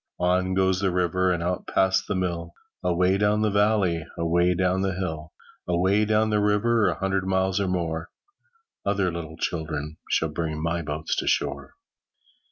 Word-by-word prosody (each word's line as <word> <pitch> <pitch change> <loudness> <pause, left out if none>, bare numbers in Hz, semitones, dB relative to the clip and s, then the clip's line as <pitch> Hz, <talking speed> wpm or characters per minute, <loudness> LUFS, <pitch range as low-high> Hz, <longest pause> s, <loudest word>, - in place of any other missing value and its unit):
On 90 +1 +1
goes 95 -1 +2
the 95 -1 +1
river 90 +1 +1
And 85 -1 -1
out 90 +1 -2
past 95 0 +2
the - - -1
mill, 85 -2 -2 0.3
Away 90 +2 +2
down 105 +1 +2
the 105 - +2
valley, 100 -5 +2
Away 85 +2 +2
down 95 +1 +1
the 95 -1 -1
hill. 80 -5 -4 0.4
Away 95 +4 +2
down 110 +1 +2
the 105 - +2
river, 105 +2 +2
A - - 0
hundred 95 -1 -1
miles 95 0 +1
or 100 - 0
more, 85 -2 -2 0.7
Other 100 -2 +1
little 80 -1 -7
children 80 -2 -3
Shall 80 - +1
bring 80 0 -3
my 85 +2 -1
boats 75 0 -2
ashore. - - -1
90 Hz, 165 wpm, -25 LUFS, 85-95 Hz, 0.7 s, goes